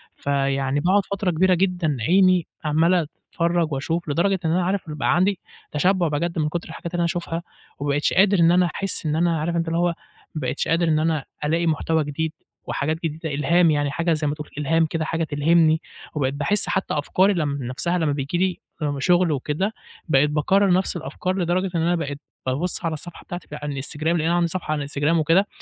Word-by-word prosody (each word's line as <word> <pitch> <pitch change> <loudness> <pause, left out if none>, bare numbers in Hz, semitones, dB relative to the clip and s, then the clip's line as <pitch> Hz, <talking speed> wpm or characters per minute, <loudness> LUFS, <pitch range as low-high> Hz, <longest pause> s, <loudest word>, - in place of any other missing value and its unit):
فيعني 135 0 0
باقعد 185 +5 +2
فترة 195 -2 -1
كبيرة 185 +3 +3
جدًا 175 -5 0
عيني 185 +4 +4 0.2
عمال 165 +2 +3 0.3
أتفرج 170 -2 +1
وأشوف 160 +4 -2
لدرجة 185 +6 +1
إن 160 - +2
أنا 180 +2 +2
عارف 190 -2 -1
يبقى 150 -1 0
عندي 190 +2 +2 0.3
تشبع 180 +3 +2
بجد 165 +3 -1
من 150 -1 +1
كتر 175 +1 -4
الحاجات 165 +1 -7
اللي 175 - -1
أنا 170 - +2
أشوفها 170 -1 -3 0.4
وما 145 +1 -2
بقيتش 145 +1 +1
قادر 195 0 +4
إن 165 0 +6
أنا 180 0 +4
أحس 195 -4 -2
إن 150 0 0
أنا 170 -1 +2
عارف 170 +3 -1
اللي 165 0 0
هو 175 0 +3 0.5
ما 155 - -3
بقيتش 130 +1 -2
قادر 165 +1 +2
إن 155 -1 +3
أنا 155 -3 0 0.2
ألاقي 165 +3 +1
محتوى 160 0 +1
جديد 155 +2 -3 0.3
وحاجات 155 +3 -1
جديدة 160 -1 -3
إلهام 165 +4 +3
يعني 145 -1 0
حاجة 165 +3 0
زي 155 -1 -1
ما 145 - -1
تقول 150 0 -8
إلهام 165 +3 +2
كده 160 0 -2
حاجة 165 +1 -1
تلهمني، 160 +1 +3 0.3
وبقيت 135 -2 0
باحس 170 +9 0
حتى 190 - -1
أفكاري 185 +7 +2
لم 145 -5 -1
نفسها 135 +9 -1
لما 160 -4 +1
بييجي 140 +4 -2
لي 185 -1 +1 0.4
شغل 175 +1 +3
وكده 150 +9 -1 0.4
بقيت 140 +1 +4
باكرر 185 +6 +2
نفس 185 0 +1
الأفكار 175 +4 -3
لدرجة 180 +1 0
إن 165 - +1
أنا 175 +2 +2
بقيت 145 -4 -4 0.3
بابص 145 +8 -2
على 165 - 0
الصفحة 165 +3 -8
بتاعتي 175 0 -7
على 150 0 -5
الانستجرام؛ 150 +2 -7
لأن 165 0 +2
أنا 165 +2 +1
عندي 175 -1 +2
صفحة 170 -2 -4
على 155 - +1
الانستجرام 145 +3 0
وكده، 165 +6 +3
165 Hz, 200 wpm, -23 LUFS, 150-175 Hz, 0.5 s, إن